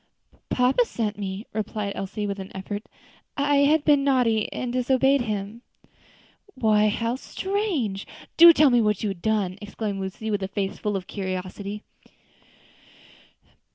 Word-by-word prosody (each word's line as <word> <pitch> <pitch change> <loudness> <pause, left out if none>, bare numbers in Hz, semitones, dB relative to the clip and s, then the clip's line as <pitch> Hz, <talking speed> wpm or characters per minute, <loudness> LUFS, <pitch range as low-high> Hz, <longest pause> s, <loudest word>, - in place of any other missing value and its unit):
"Papa 255 - +3
sent 215 - -3
me," 195 +2 -5
replied 210 -1 -3
Elsie, 195 +2 -4
with 200 -1 -3
an 190 0 -8
effort. 205 +2 -6 0.5
"I 285 0 +2
had 290 +2 +3
been 290 -2 +4
naughty, 245 -6 +2
and 245 -1 -4
disobeyed 265 +2 +3
him." 215 0 -4 0.9
"Why, 215 -3 +3
how 230 +3 -1
strange! 340 - -2 0.3
Do 340 +1 +10
tell 305 -4 +5
me 240 -1 +4
what 210 -2 0
you 210 - 0
had 185 -3 -9
done!" 205 -3 0
exclaimed 205 -1 -4
Lucy, 205 +4 -4
with 205 -1 -1
a 190 - -2
face 195 0 -3
full 210 -1 -2
of 190 -2 -3
curiosity. 195 +2 -5
215 Hz, 145 wpm, -25 LUFS, 200-255 Hz, 0.9 s, Do